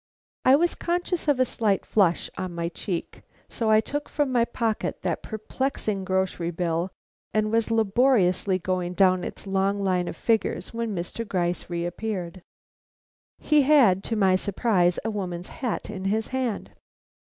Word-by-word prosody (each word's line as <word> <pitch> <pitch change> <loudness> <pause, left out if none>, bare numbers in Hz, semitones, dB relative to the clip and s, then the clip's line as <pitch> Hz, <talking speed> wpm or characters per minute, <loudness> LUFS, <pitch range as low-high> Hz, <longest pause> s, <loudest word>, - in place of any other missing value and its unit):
I 260 - +8
was 345 +4 +2
conscious 350 -1 -2
of 285 -3 +3
a 255 - +5
slight 210 -6 0
flush 185 -5 +2
on 185 -2 -5
my 170 0 -2
cheek, 175 0 -5 0.3
so 225 -2 -1
I 215 0 +6
took 290 +6 -4
from 290 -3 0
my 240 -2 +3
pocket 230 -2 -2
that - - -1
perplexing 215 -2 -3
grocer 190 -2 -1
bill 170 +1 -1 0.5
and 215 0 +2
was 230 0 +1
laboriously 215 -4 +3
going 180 0 -2
down 185 -1 +4
its - - -7
long 195 +1 0
line 180 -2 +1
of - - -4
figures, 225 0 0
when 230 -2 -2
Mr. 175 +6 -4
Gryce 180 -5 -2
reappeared. 175 +1 -4 1.0
He 300 -1 +3
had 260 -10 +5
to 230 - -1
my 190 -3 +4
surprise 185 -2 +1
a 225 - 0
woman's 180 -4 -4
hat 245 -4 -4
in 190 -2 -6
his 215 +3 0
hand. 255 -5 -2
200 Hz, 155 wpm, -25 LUFS, 180-230 Hz, 1.0 s, I